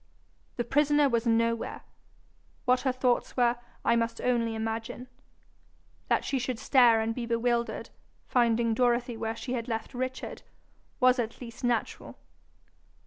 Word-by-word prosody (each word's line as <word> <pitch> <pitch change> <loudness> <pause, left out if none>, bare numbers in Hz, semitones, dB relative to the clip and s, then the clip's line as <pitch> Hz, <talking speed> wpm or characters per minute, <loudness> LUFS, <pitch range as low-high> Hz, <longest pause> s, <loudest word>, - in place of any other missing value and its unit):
The 240 - -1
prisoner 290 +3 +3
was 235 -2 0
nowhere. 230 0 0 0.8
What 250 0 +3
her 265 - +1
thoughts 250 0 0
were, 240 -1 +3 0.3
I 235 - +4
must 230 0 -1
only 235 -2 0
imagine. 225 +3 -4 1.0
That - - +1
she 270 - 0
should 250 -1 -2
stare 240 -3 +5
and 220 +1 -1
be 235 0 -4
bewildered, 235 0 -1 0.3
finding 235 -2 +2
Dorothy 240 0 +1
where 225 0 -3
she 250 +2 -5
had 235 -2 -3
left 225 +1 -4
Richard, 255 +1 -4 0.6
was 255 0 +4
at 230 -1 -3
least 240 -1 -10
natural. 240 -2 -2
240 Hz, 140 wpm, -28 LUFS, 230-250 Hz, 1.0 s, stare